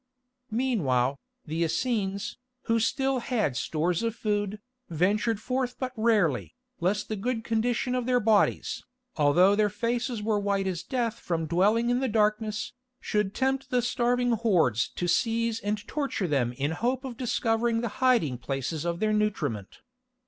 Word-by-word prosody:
Meanwhile, 145 Hz, -, +1 dB, 0.3 s
the 160 Hz, +2 st, -1 dB
Essenes, 200 Hz, +2 st, -1 dB, 0.2 s
who 230 Hz, 0 st, +2 dB
still 270 Hz, +3 st, +1 dB
had 225 Hz, -, -1 dB
stores 165 Hz, +6 st, 0 dB
of 230 Hz, -1 st, -1 dB
food, 210 Hz, -2 st, -1 dB, 0.3 s
ventured 205 Hz, +7 st, +1 dB
forth 250 Hz, +2 st, -2 dB
but 255 Hz, -1 st, -3 dB
rarely, 170 Hz, -, +1 dB, 0.2 s
lest 200 Hz, +5 st, 0 dB
the 215 Hz, -, -2 dB
good 225 Hz, +3 st, -2 dB
condition 230 Hz, +2 st, 0 dB
of 250 Hz, -1 st, -1 dB
their 250 Hz, -1 st, +3 dB
bodies, 215 Hz, -2 st, +2 dB, 0.3 s
although 175 Hz, +6 st, +5 dB
their 210 Hz, 0 st, +3 dB
faces 230 Hz, +2 st, -2 dB
were 215 Hz, -1 st, +1 dB
white 200 Hz, -1 st, 0 dB
as 180 Hz, -3 st, -2 dB
death 235 Hz, +1 st, -2 dB
from 165 Hz, -2 st, -2 dB
dwelling 210 Hz, +9 st, +2 dB
in 245 Hz, -, +2 dB
the 265 Hz, -, 0 dB
darkness, 215 Hz, 0 st, 0 dB, 0.3 s
should 210 Hz, -1 st, -1 dB
tempt 265 Hz, 0 st, 0 dB
the 250 Hz, -1 st, +1 dB
starving 245 Hz, 0 st, +1 dB
hordes 180 Hz, -, +2 dB
to 175 Hz, -, -2 dB
seize 230 Hz, +3 st, +1 dB
and 205 Hz, +1 st, -3 dB
torture 275 Hz, -10 st, -2 dB
them 135 Hz, -6 st, +1 dB
in 140 Hz, +4 st, -1 dB
the -, -, -3 dB
hope 255 Hz, +3 st, -1 dB
of 255 Hz, -3 st, -5 dB
discovering 230 Hz, -1 st, 0 dB
the 235 Hz, -, -2 dB
hiding 230 Hz, -, +3 dB
places 135 Hz, +5 st, -3 dB
of 170 Hz, +1 st, -2 dB
their 215 Hz, 0 st, +2 dB
nutriment. 155 Hz, -, -2 dB
215 Hz, 155 wpm, -27 LUFS, 175-240 Hz, 0.3 s, although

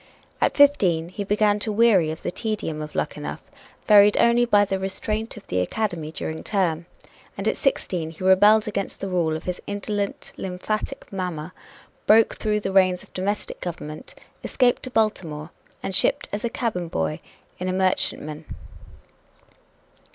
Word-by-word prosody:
At -, -, +1 dB
fifteen 190 Hz, -, +4 dB
he 205 Hz, +3 st, -5 dB
began 205 Hz, +1 st, +2 dB
to 215 Hz, -, -2 dB
weary 205 Hz, -7 st, +4 dB
of 160 Hz, +1 st, -6 dB
the -, -, -2 dB
tedium 205 Hz, -8 st, -3 dB
of 150 Hz, -, -7 dB
Luckenough, -, -, -3 dB, 0.4 s
varied 205 Hz, -1 st, +7 dB
only 235 Hz, +1 st, +4 dB
by 205 Hz, -3 st, +4 dB
the 195 Hz, -1 st, -2 dB
restraint 215 Hz, +4 st, -3 dB
of 210 Hz, -, -11 dB
the 90 Hz, -, -1 dB
academy 165 Hz, -, -2 dB
during 160 Hz, 0 st, -5 dB
term. 175 Hz, -5 st, 0 dB, 0.5 s
And -, -, -3 dB
at -, -, +2 dB
sixteen 175 Hz, -, -1 dB
he 160 Hz, +3 st, -10 dB
rebelled 205 Hz, +4 st, +5 dB
against 200 Hz, -2 st, -3 dB
the 195 Hz, -, -4 dB
rule 170 Hz, -4 st, +1 dB
of 160 Hz, -, -11 dB
his 180 Hz, -1 st, -4 dB
indolent 205 Hz, 0 st, -3 dB
lymphatic 190 Hz, +3 st, -4 dB
mamma, 180 Hz, -3 st, -4 dB, 0.5 s
broke 220 Hz, +1 st, +6 dB
through 210 Hz, -1 st, -1 dB
the 195 Hz, -, -2 dB
reins 185 Hz, -2 st, +3 dB
of -, -, -20 dB
domestic 200 Hz, +2 st, -3 dB
government, 155 Hz, -3 st, -7 dB, 0.3 s
escaped 250 Hz, -2 st, +2 dB
to 255 Hz, -, -5 dB
Baltimore 175 Hz, -9 st, -1 dB, 0.3 s
and 195 Hz, -, -3 dB
shipped 185 Hz, -, +2 dB
as 205 Hz, -, -2 dB
cabin 195 Hz, -8 st, -2 dB
boy 80 Hz, -, -2 dB, 0.4 s
in 180 Hz, -, -3 dB
a -, -, +1 dB
merchantman. 175 Hz, -5 st, -1 dB
190 Hz, 155 wpm, -24 LUFS, 170-210 Hz, 0.5 s, varied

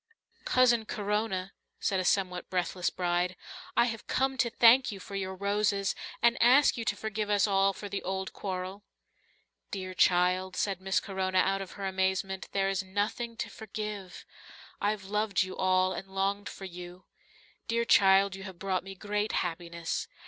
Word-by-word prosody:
"Cousin 240 Hz, -3 st, +4 dB
Corona," 205 Hz, -3 st, -2 dB, 0.3 s
said 190 Hz, -, 0 dB
a -, -, 0 dB
somewhat 180 Hz, -1 st, 0 dB
breathless 180 Hz, -1 st, 0 dB
bride, 180 Hz, 0 st, 0 dB, 0.4 s
"I -, -, +6 dB
have 225 Hz, -2 st, -5 dB
come 265 Hz, +1 st, +1 dB
to 240 Hz, -, +3 dB
thank 240 Hz, +2 st, +6 dB
you 200 Hz, -, -7 dB
for 200 Hz, -, -11 dB
your 190 Hz, -1 st, -3 dB
roses 200 Hz, 0 st, +1 dB, 0.3 s
and 235 Hz, 0 st, +4 dB
ask 260 Hz, +5 st, +6 dB
you 235 Hz, -, -3 dB
to -, -, 0 dB
forgive 215 Hz, -1 st, -3 dB
us 205 Hz, -1 st, +4 dB
all 195 Hz, -1 st, +3 dB
for 205 Hz, +1 st, -8 dB
the 200 Hz, 0 st, -4 dB
old 190 Hz, +1 st, -3 dB
quarrel." 190 Hz, +1 st, -5 dB, 0.9 s
"Dear 185 Hz, -2 st, -5 dB
child," 180 Hz, +1 st, +3 dB
said 195 Hz, -2 st, -1 dB
Miss 190 Hz, 0 st, +1 dB
Corona 190 Hz, -2 st, -2 dB
out 195 Hz, +1 st, +2 dB
of 190 Hz, -, -7 dB
her 200 Hz, -, -6 dB
amazement, 190 Hz, 0 st, -1 dB
"there 195 Hz, -1 st, +1 dB
is 195 Hz, -1 st, 0 dB
nothing 205 Hz, +5 st, -3 dB
to -, -, -3 dB
forgive. 210 Hz, -3 st, -6 dB, 0.6 s
I've 205 Hz, -1 st, 0 dB
loved 210 Hz, 0 st, +1 dB
you 185 Hz, 0 st, -6 dB
all 185 Hz, 0 st, +2 dB
and 195 Hz, -, -6 dB
longed 195 Hz, +1 st, -1 dB
for 195 Hz, -, -9 dB
you. 180 Hz, 0 st, -9 dB, 0.6 s
Dear 235 Hz, 0 st, +1 dB
child, 195 Hz, -2 st, +5 dB
you 195 Hz, -, -9 dB
have 190 Hz, -2 st, -8 dB
brought 190 Hz, 0 st, -1 dB
me 195 Hz, 0 st, -9 dB
great 210 Hz, +2 st, -2 dB
happiness." 170 Hz, -1 st, -4 dB
195 Hz, 170 wpm, -30 LUFS, 185-210 Hz, 0.9 s, I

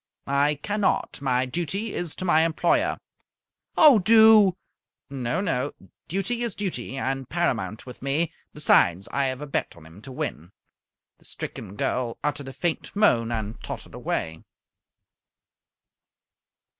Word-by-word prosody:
"I 140 Hz, +2 st, +2 dB
cannot. 205 Hz, -7 st, 0 dB
My 130 Hz, -2 st, +1 dB
duty 175 Hz, -, -3 dB
is 175 Hz, -3 st, -3 dB
to 185 Hz, -, -5 dB
my 160 Hz, -3 st, +4 dB
employer." 175 Hz, -, +1 dB, 0.8 s
"Oh, 290 Hz, -8 st, +8 dB
do!" 215 Hz, -2 st, +6 dB, 0.5 s
"No, 135 Hz, +6 st, -2 dB
no. 145 Hz, -7 st, -1 dB, 0.3 s
Duty 195 Hz, +7 st, -2 dB
is 235 Hz, -4 st, -3 dB
duty, 135 Hz, -, -4 dB
and 135 Hz, -1 st, -3 dB
paramount 110 Hz, -, -1 dB
with 125 Hz, -, -11 dB
me. 145 Hz, +5 st, 0 dB, 0.2 s
Besides, 95 Hz, -, +3 dB
I 140 Hz, 0 st, +1 dB
have 130 Hz, +1 st, -3 dB
a -, -, -4 dB
bet 140 Hz, -, -3 dB
on 80 Hz, -, -15 dB
him 80 Hz, +5 st, -14 dB
to 130 Hz, -, -10 dB
win." 90 Hz, -, -5 dB, 0.7 s
The -, -, -23 dB
stricken 100 Hz, -2 st, -7 dB
girl 120 Hz, +2 st, -2 dB
uttered 145 Hz, -2 st, -2 dB
a -, -, -6 dB
faint 170 Hz, +5 st, -3 dB
moan, 120 Hz, -, +3 dB
and 110 Hz, -1 st, -4 dB
tottered -, -, -7 dB
away. 80 Hz, 0 st, -3 dB
145 Hz, 135 wpm, -25 LUFS, 125-185 Hz, 0.8 s, Oh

